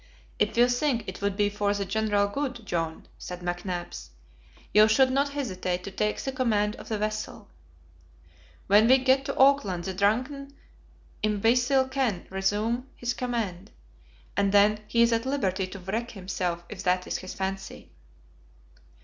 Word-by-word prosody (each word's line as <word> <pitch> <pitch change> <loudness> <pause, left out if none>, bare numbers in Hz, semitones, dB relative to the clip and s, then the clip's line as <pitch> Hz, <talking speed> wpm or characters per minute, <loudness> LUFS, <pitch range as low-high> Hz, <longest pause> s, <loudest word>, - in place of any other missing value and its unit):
"If - - +1
you 240 +1 +6
think 245 -1 0
it 190 - -7
would 200 -1 -1
be 205 -1 +3
for 205 0 0
the 200 -1 -2
general 205 0 +1
good, 250 0 -4
John," 165 -3 -3
said 180 0 -7
McNabbs, 175 - -4 0.6
"you 215 +1 +7
should 260 +4 +4
not 280 +2 +1
hesitate 185 -9 -3
to 200 - -6
take 210 +2 -1
the 270 - -3
command 215 -5 +1
of - - -11
the 220 - -1
vessel. 215 +1 -4 1.2
When 210 +3 +5
we 260 +2 +7
get 265 +1 +2
to - - -4
Auckland 260 -11 +3
the 190 - -4
drunken 255 +8 -1 0.7
imbecile 245 +6 +2
can 260 -8 -1
resume 210 +6 -1
his 245 0 -2
command, 220 -7 -3 0.7
and 200 -1 +2
then 205 +1 +5
he 235 +2 +3
is 235 0 +3
at 230 +3 0
liberty 195 -9 0
to 195 - -9
wreck 210 +6 -3
himself, 180 -3 -3
if 210 -3 -8
that 180 -1 +1
is - - -3
his 185 - -8
fancy." 195 0 -5
210 Hz, 160 wpm, -27 LUFS, 190-245 Hz, 1.2 s, you